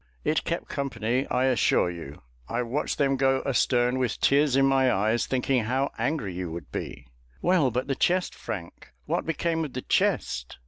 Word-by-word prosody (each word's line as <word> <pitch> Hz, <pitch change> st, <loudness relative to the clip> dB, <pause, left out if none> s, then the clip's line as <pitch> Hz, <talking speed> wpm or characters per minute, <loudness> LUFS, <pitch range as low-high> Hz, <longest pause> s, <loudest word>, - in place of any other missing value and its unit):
"It -, -, +1 dB
kept -, -, -2 dB
company, 130 Hz, -2 st, -2 dB
I 125 Hz, +1 st, +1 dB
assure 120 Hz, -8 st, +2 dB
you. 80 Hz, -6 st, -9 dB, 0.3 s
I 125 Hz, -, -1 dB
watched 125 Hz, +5 st, -2 dB
them 135 Hz, -2 st, +2 dB
go 135 Hz, 0 st, +2 dB
astern, 125 Hz, -1 st, +2 dB
with 125 Hz, -4 st, -1 dB
tears 140 Hz, -1 st, +3 dB
in 135 Hz, 0 st, +4 dB
my 135 Hz, -1 st, +3 dB
eyes, 110 Hz, +4 st, +1 dB
thinking 130 Hz, -2 st, +1 dB
how 130 Hz, +4 st, 0 dB
angry 145 Hz, -, -2 dB
you 90 Hz, -2 st, -4 dB
would 85 Hz, +1 st, -8 dB
be." -, -, -6 dB, 0.3 s
"Well, 175 Hz, -7 st, +3 dB
but 125 Hz, +2 st, -2 dB
the 135 Hz, -, -1 dB
chest, 180 Hz, +6 st, +1 dB
Frank, 85 Hz, -, -8 dB
what -, -, -2 dB
became 165 Hz, +1 st, 0 dB
of 150 Hz, -, -6 dB
the 130 Hz, -, -4 dB
chest? 60 Hz, -1 st, 0 dB
130 Hz, 180 wpm, -26 LUFS, 110-140 Hz, 0.3 s, in